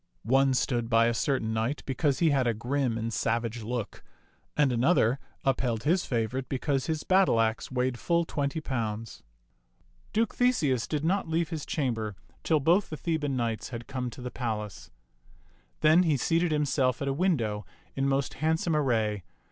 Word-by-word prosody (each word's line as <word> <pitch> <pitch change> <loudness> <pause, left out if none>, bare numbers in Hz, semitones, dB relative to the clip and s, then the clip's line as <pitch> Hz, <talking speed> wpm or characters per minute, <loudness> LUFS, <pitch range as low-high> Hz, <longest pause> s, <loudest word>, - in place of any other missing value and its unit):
One 135 +2 +3
stood 120 -3 0
by 115 -1 +5
a 120 - +2
certain 115 -2 0
knight 115 +6 -1
because 135 +1 0
he 165 -3 +3
had 135 -3 +2
a 115 - +1
grim 125 +1 -1
and 115 0 -3
savage 115 +1 -1
look, 115 -1 -4 0.5
and 145 -3 +4
another 125 0 +3 0.2
upheld 125 -4 0
his 175 +6 +1
favorite 125 +2 -2
be 135 - -1
cause 135 -1 -1
his 155 -1 -2
battle 185 -10 +4
axe 110 0 0
weighed 125 -1 -1
full 170 -1 +1
twenty 145 0 -2
pounds. 115 -5 -4 0.9
Duke 225 0 +1
Theseus 150 - +1
did 150 0 -2
not 190 0 0
leave 165 -1 0
his 155 -3 -5
chamber 115 -8 -2 0.3
till 160 -2 +3
both 170 +8 +3
the 155 - -5
Theban 150 -5 -1
knights 115 -4 -2
had 120 -2 -6
come 130 -2 -3
to 125 - -11
the 125 - -5
palace. 110 -5 -4 0.9
Then 155 +3 +6
he 160 -5 +2
seated 165 +5 +1
himself 140 -4 +1
at - - -3
a 135 - +1
window 130 - 0 0.3
in 135 0 0
most 135 -1 0
handsome 160 +2 0
ar 150 - +3
ray. 110 -6 0
130 Hz, 175 wpm, -28 LUFS, 115-155 Hz, 0.9 s, Then